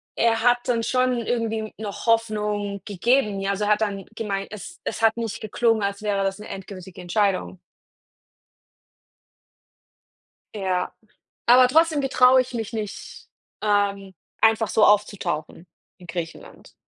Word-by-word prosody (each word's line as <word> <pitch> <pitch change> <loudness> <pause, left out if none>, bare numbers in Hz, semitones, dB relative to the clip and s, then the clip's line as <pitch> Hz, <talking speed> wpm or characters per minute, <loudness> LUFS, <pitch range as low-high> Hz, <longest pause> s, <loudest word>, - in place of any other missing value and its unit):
er 225 -1 +2
hat 245 0 +5
dann 230 -2 0
schon 255 0 +1
irgendwie 225 -2 -2
noch 210 0 -6
Hoffnung 210 -3 0
gegeben, 210 +1 +1
ja, 195 0 -2
also 200 +1 -2
er 210 - +1
hat 210 - +3
dann 200 -2 -2
gemeint, 200 -3 -3
es 215 - -9
es - - -4
hat 225 0 +3
nicht 225 -3 -4
geklungen, 225 +1 +1
als 200 +1 -3
wäre 200 -2 0
das 195 +1 -1
'ne 210 - -9
endgültige 190 -1 -9
Entscheidung. 185 0 0 3.0
Ja. 185 -2 -1 0.5
Aber 250 +1 +7
trotzdem 320 +1 +3
getraue 260 -1 +5
ich 255 - -12
mich 225 -2 -4
nicht, 210 -2 -6 0.4
ähm, 200 -2 0 0.3
einfach 220 -1 +4
so 215 - +4
aufzutauchen 185 -5 0 0.3
in 180 - -14
Griechenland. 170 -2 -8
210 Hz, 135 wpm, -23 LUFS, 195-230 Hz, 3.0 s, Aber